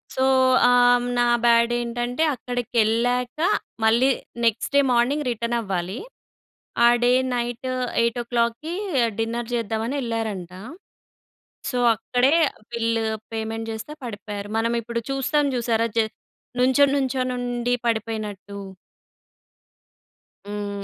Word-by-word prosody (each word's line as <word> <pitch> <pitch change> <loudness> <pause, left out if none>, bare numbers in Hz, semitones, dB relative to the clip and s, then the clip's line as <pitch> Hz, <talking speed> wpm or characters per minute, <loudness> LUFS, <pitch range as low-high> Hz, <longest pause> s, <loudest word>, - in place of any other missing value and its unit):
So, 260 - +1 0.5
ఆహ్, 245 0 +5
హ్మ్, 245 0 -3
నా 240 - +3 0.2
బ్యాడేంటంటే, 240 +3 +2
అక్కడకెళ్ళాక 245 +1 0 0.4
మళ్ళీ 235 +4 +4 0.3
నెక్స్ట్ 230 +4 0
డే - - +7
మార్నింగ్ 255 +5 +2
రిటర్నవ్వాలి. 220 -5 -2 0.9
ఆ - - +8 0.2
డే 245 - +4 0.2
నైట్ 240 +1 -3 0.3
8:00 235 0 +1
ఓ - - -5
క్లాక్‌కీ 235 +7 0 0.5
డిన్నర్ 230 +1 -2
జేద్దామని 230 +3 -2
యెళ్ళారంట. 220 -7 -3 1.2
సో, 250 - -2 0.2
అక్కడే 250 +5 +1 0.2
ఆహ్, - - -22
బిల్లు, 230 -1 0 0.3
పేమెంట్ 225 0 -4
జేస్తా 225 +7 -7
పడిపోయారు. 205 -2 -6
మనమిప్పుడు 235 +1 -1
చూస్తాం 285 +2 +1
జూశారా? 230 -1 +1
జ - - +5 0.6
నుంచోనుంచోనుండి 255 -2 +1
పడిపోయినట్టు. 215 -3 -3 1.9
హ్మ్. 205 -1 -5
235 Hz, 100 wpm, -23 LUFS, 225-245 Hz, 1.9 s, ఆ